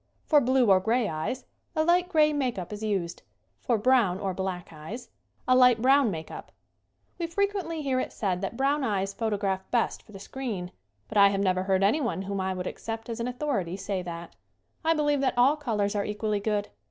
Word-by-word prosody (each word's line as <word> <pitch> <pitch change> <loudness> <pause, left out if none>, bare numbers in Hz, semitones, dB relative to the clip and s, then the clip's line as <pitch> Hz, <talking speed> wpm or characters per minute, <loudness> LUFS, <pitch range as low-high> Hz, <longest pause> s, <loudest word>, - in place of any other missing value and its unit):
For 295 -2 +5
blue 255 -3 +3
or 190 - +6
gray 225 +4 +1
eyes, 160 +10 -3 0.3
a 315 - +2
light 350 +2 +3
gray 305 -4 +4
make 260 -6 -1
up 185 +2 -5
is 210 - -7
used; 190 -5 -2 0.4
for 240 -3 +1
brown 220 -5 +3
or 195 -2 -2
black 185 -1 -4
eyes, 200 +11 -8 0.4
a 255 - +5
light 250 -2 +6
brown 265 +1 +4
make 160 -4 -5
up. - - -9 0.7
We 340 - -1
frequently 365 -3 -1
hear 265 -2 +1
it - - -3
said 190 -4 -2
that 200 +4 -4
brown 280 +2 +1
eyes 200 -4 -1
photograph 200 -3 -2
best 240 -2 0
for - - -19
the 200 - -9
screen, 200 -5 -5 0.4
but 210 - 0
I 200 - +9
have 195 0 -1
never 185 -2 +2
heard 190 0 +1
anyone 230 -2 +1
whom 195 0 -3
I 190 0 -1
would 180 0 -4
accept 225 +3 -5
as 230 - -4
an 235 - -2
authority 245 - -2
say 195 -1 -3
that. 170 -1 -8 0.5
I 325 0 +3
believe 295 -2 +1
that 260 -2 0
all 260 +5 +5
colors 220 -9 -1
are 205 - +1
equally 210 0 -2
good. 210 0 -1
220 Hz, 205 wpm, -27 LUFS, 190-265 Hz, 0.7 s, I